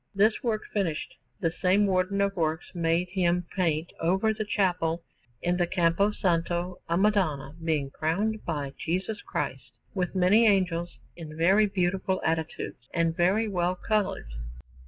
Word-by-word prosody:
This 215 +3 +3
work 225 -5 -1
finished, 175 -7 -1 0.3
the 165 - +1
same 195 +3 +4
Warden 190 +1 +1
of 200 0 +1
Works 160 -1 -2
made 170 +1 +1
him 180 -2 +1
paint 165 -3 0
over 190 +6 +2
the 215 0 -3
chapel 175 -5 0 0.4
in 175 0 +1
the 175 -1 +1
Campo 175 +3 +2
Santo 175 -2 -1
a 170 - +2
Madonna 180 -9 +1
being 150 -4 0
crowned 205 +10 -1
by 145 -4 -3
Jesus 185 +7 -2
Christ, - - -4 0.2
with 185 -1 -2
many 195 +5 +5
angels 175 -4 +1 0.2
in 155 -2 -9
very 195 +6 +4
beautiful 190 -1 0
attitudes 160 -5 -3
and 165 -1 +1
very 195 +6 +2
well 180 -2 0
coloured. 205 - -1
180 Hz, 145 wpm, -27 LUFS, 165-200 Hz, 0.4 s, many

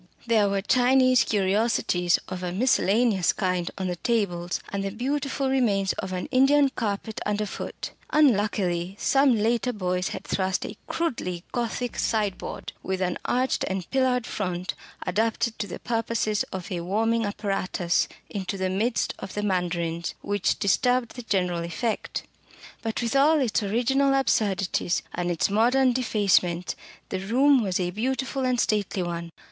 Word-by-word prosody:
There 220 -4 +3
were 195 -1 -1
Chinese 255 +1 +4
curiosities 195 -3 +2
of 185 -1 -5
a 180 -1 -3
miscellaneous 210 -2 +2
kind 180 -2 -1
on 190 - -3
the 180 -1 -2
tables, 180 -6 -1
and 200 -1 -3
the 195 - -1
beautiful 270 +5 -2
remains 215 -8 +2
of 190 - -4
an 180 -1 -3
Indian 275 +2 +5
carpet 220 -3 -3
underfoot. 210 -1 -3 0.2
Unluckily, 200 - +2
some 270 -2 +4
later 230 +3 +1
Boyce 180 -4 -1
had 190 - -5
thrust 190 -1 -1
a - - -6
crudely 180 - -2
Gothic 240 0 -2
sideboard, 210 -4 -2
with 190 0 -2
an 180 -1 -1
arched 255 +1 +1
and 190 -2 -3
pillared 255 -2 +2
front, 180 -4 -3 0.3
adapted 225 +4 0
to 205 - -2
the 175 - -6
purposes 225 -2 -1
of 190 +2 -6
a 175 -2 -2
warming 225 +6 +1
apparatus, 195 -4 0 0.2
into 195 -1 -4
the 185 -1 -1
midst 220 +5 0
of 190 - -7
the 210 - -2
mandarins, 170 -3 -1
which 205 -1 0
disturbed 245 +4 +1
the 250 - -6
general 180 -6 0
effect. 210 +7 -3 0.6
But 225 +1 -2
with 235 +3 -1
all 300 +3 +5
its 235 -5 +1
original 265 +6 +2
absurdities, 195 -9 +1
and 175 0 -2
its 175 +3 +1
modern 250 +4 +4
defacements, 195 -7 +1 0.3
the - - -2
room 255 +7 +4
was 190 -4 0
a 180 -1 -1
beautiful 260 +5 -2
and 250 -1 +1
stately 205 -4 0
one. 170 -1 -4
205 Hz, 150 wpm, -26 LUFS, 185-245 Hz, 0.6 s, Indian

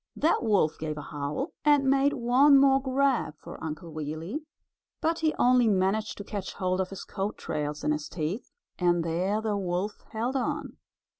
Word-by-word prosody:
That 320 - +2
wolf 205 -9 +2
gave 155 -1 -3
a - - -4
howl, 145 - -4
and 290 -2 +4
made 275 +1 +4
one 270 +3 +5
more 270 0 +5
grab 265 - +1
for - - -10
Uncle 160 +1 -5
Wiggily, 155 - -4 0.6
but 330 +1 0
he 315 -1 +2
only 250 -1 +4
managed 200 +2 +1
to 205 - -6
catch 200 -2 -5
hold 185 0 0
of 185 - -3
his 195 - -7
coat 200 +2 -4
tails 150 0 -3
in 150 - +1
his 150 0 -2
teeth, 170 +8 -3 0.3
and 175 -2 +2
there 180 +6 0
the 215 -2 -1
wolf 190 +1 -2
held 235 +4 -2
on. 290 +4 -2
205 Hz, 175 wpm, -28 LUFS, 165-265 Hz, 0.6 s, one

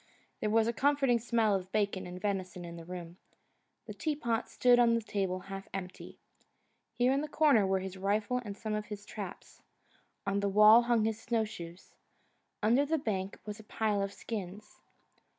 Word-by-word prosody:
There 215 - -1
was 220 +1 +3
a 235 - 0
comforting 270 -3 +2
smell 225 -2 +2
of 190 -1 -2
bacon 200 -3 0
and 180 +1 -7
venison 185 -3 -3
in 170 0 -8
the 165 -1 -9
room; 175 -1 -8 0.7
the - - -7
tea 310 -2 -2
pot 235 -5 -2
stood 245 -1 +4
on 235 -1 +5
the 230 - 0
table 190 -3 -2
half 195 0 -8
empty. 185 -1 -7 0.8
Here 245 +3 +3
in 275 - +1
the 305 - -3
corner 290 -10 +4
were 190 0 +1
his 190 0 -6
rifle 210 +5 0
and 205 -3 -7
some 215 0 -4
of 210 0 -3
his 205 -1 -7
traps. - - -8 0.6
On 200 0 0
the 200 0 0
wall 210 +3 +8
hung 235 -2 +2
his 220 0 -2
snowshoes. 210 -7 -4 0.7
Under 240 +6 +4
the 315 +3 0
bunk 195 -8 -3
was 210 0 -6
a - - -11
pile 210 -1 -1
of 195 0 -2
skins. 205 -1 -7
210 Hz, 185 wpm, -31 LUFS, 195-235 Hz, 0.8 s, wall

